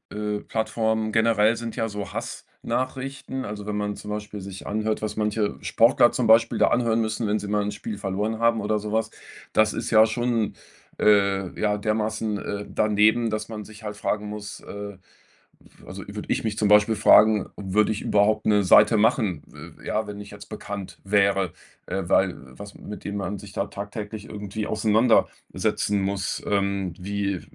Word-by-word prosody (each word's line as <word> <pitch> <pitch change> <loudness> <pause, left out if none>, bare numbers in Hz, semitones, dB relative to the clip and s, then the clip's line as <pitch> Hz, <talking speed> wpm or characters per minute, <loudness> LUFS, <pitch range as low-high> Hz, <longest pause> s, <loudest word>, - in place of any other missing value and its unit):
äh, 105 0 -2
Plattformen 110 -1 -1
generell 110 0 +3
sind 115 -1 -5
ja 115 - -1
so 100 -2 -6
Hass-Nachrichten, 130 +1 -4
also 105 -2 -6
wenn 105 0 -3
man 105 0 -2
zum 105 - -7
Beispiel 105 0 -5
sich 95 0 -9
anhört, 110 +1 -1
was 110 - -4
manche 105 -1 0
Sportler 120 +1 +4
zum 125 - 0
Beispiel 115 +1 +5
da - - +4
anhören 115 -2 +2
müssen, 110 0 -2
wenn 105 +1 +1
sie 105 - -6
mal 105 0 +1
'n 105 - -2
Spiel 105 +1 -6
verloren 105 +3 -2
haben 115 -1 +2
oder 105 +1 0
so 105 0 -5
was. 110 0 0 0.4
Das 110 0 +3
ist - - -4
ja 110 -1 +7
schon, 115 -1 -1 0.4
äh, 100 -3 +2
ja, 105 -1 +1
dermaßen, 110 0 -1
äh, 100 0 -5
daneben, 110 +2 +3
dass 110 0 -3
man 105 -2 -6
sich 110 0 -13
halt 105 -1 -6
fragen 105 0 -2
muss 105 0 -7
äh, 100 -1 -8 0.7
f - - -21
also - - -8
würde - - -7
ich - - -1
mich 110 -2 -2
zum 105 - +1
Beispiel 105 +2 +5
fragen, 105 -1 +5
würde 105 +2 +1
ich 105 - -4
überhaupt 105 +1 +2
'ne 105 -1 +4
Seite 105 +4 +6
machen, 105 - +2
we - - -13
ja, 110 0 -1
wenn 105 0 -7
ich 100 - -10
jetzt 100 0 -12
bekannt 100 -3 -7
wäre, 100 -2 +2 0.3
äh, 95 - -2
weil 95 +1 +3 0.2
was 100 0 -9
mit 105 - -9
dem 100 0 -4
man 100 0 -3
sich 100 0 -11
da 100 - -2
tagtäglich 105 +1 -7
irgendwie 105 0 -5
auseinandersetzen 110 -1 +1
muss. 95 0 -2
Ähm, 100 -3 0
wie 100 0 -2
105 Hz, 180 wpm, -24 LUFS, 100-110 Hz, 0.7 s, ja